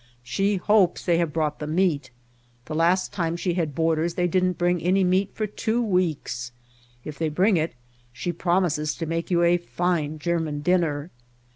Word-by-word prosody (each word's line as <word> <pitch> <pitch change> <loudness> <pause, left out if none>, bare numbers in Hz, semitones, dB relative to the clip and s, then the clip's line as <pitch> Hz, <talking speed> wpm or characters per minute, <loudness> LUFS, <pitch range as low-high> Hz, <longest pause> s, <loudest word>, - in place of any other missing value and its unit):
She 195 +12 0
hopes 195 -1 +2
they 170 -2 +3
have 170 -3 0
brought 150 -1 -1
the 150 - -4
meat. 155 -5 +1 0.6
The 155 - -6
last 170 +4 +2
time 170 -3 -1
she 175 0 -1
had 160 -5 -2
boarders 165 +1 +1
they 180 -1 +1
didn't 180 0 +1
bring 175 -1 +1
any 185 +3 +2
meat 185 +2 +2
for 215 - -1
two 220 +3 -1
weeks. 175 - -1 0.5
If 150 -2 -7
they 160 -1 0
bring 185 +7 +3
it 160 -5 -1 0.4
she 175 +8 -3
prom 175 +2 +1
ises 155 -3 -1
to 165 - -3
make 165 +1 -3
you 175 -2 +3
a 170 +1 +4
fine 175 -3 -1
German 160 -2 -2
dinner. 165 -2 0
170 Hz, 180 wpm, -24 LUFS, 155-185 Hz, 0.6 s, a